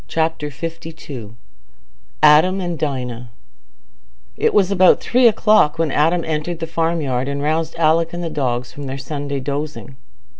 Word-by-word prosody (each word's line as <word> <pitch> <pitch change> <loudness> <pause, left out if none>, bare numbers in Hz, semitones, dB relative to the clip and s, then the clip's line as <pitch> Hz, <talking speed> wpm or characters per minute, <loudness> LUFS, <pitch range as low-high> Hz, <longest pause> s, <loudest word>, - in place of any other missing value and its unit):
Chapter 160 -2 -1
LII 145 -6 -8 0.9
Adam 160 +6 +6
and 175 -4 -4
Dinah 125 -5 -4 1.1
It - - +1
was 195 -2 +2
about 185 -2 +5
three 245 0 +3
o'clock 210 -8 +3
when 160 -3 0
Adam 165 +4 +1
entered 160 +2 -3
the 165 - -4
farmyard 160 -6 -1
and 140 0 -3
roused 160 +2 -1
Alick 165 0 +2
and 175 0 -5
the 165 - -3
dogs 125 -4 -2
from 145 - -8
their 135 +1 -5
Sunday 140 +1 -4
dozing. 140 0 -5
155 Hz, 145 wpm, -19 LUFS, 140-165 Hz, 1.1 s, Adam